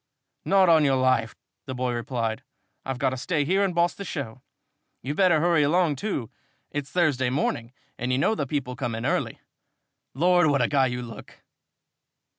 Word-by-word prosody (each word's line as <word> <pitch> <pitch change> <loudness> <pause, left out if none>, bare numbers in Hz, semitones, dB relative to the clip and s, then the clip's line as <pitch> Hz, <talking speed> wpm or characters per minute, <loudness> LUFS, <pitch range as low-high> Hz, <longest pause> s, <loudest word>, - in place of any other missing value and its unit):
"Not 195 -1 +4
on 160 -2 +5
your 135 -2 +3
life!" 130 -3 +1 0.3
the 130 - -4
boy 125 -1 -1
replied. 120 -1 -3 0.4
"I've 135 -1 -4
got 130 0 +1
to 130 - -4
stay 145 +3 -1
here 190 +6 +2
and 185 -3 -1
boss 170 0 +2
the 200 - -8
show. 130 - -6 0.6
You'd 145 +4 -4
better 180 -5 +4
hurry 170 -1 +3
along, 155 0 +2
too. 140 - -3 0.4
It's 145 -2 -4
Thursday 145 -8 +1
morning 120 -3 -2 0.3
and 125 +2 -2
you 130 - +2
know 140 +10 +2
the 145 -10 -3
people 125 -3 -3
come 120 -4 -3
in 115 - -4
early. - - -1 0.7
Lord, 175 +3 +4
what 145 -2 +2
a - - +2
guy 135 -3 +2
you 125 0 -4
look!" 115 -2 -11
140 Hz, 185 wpm, -25 LUFS, 125-170 Hz, 0.7 s, on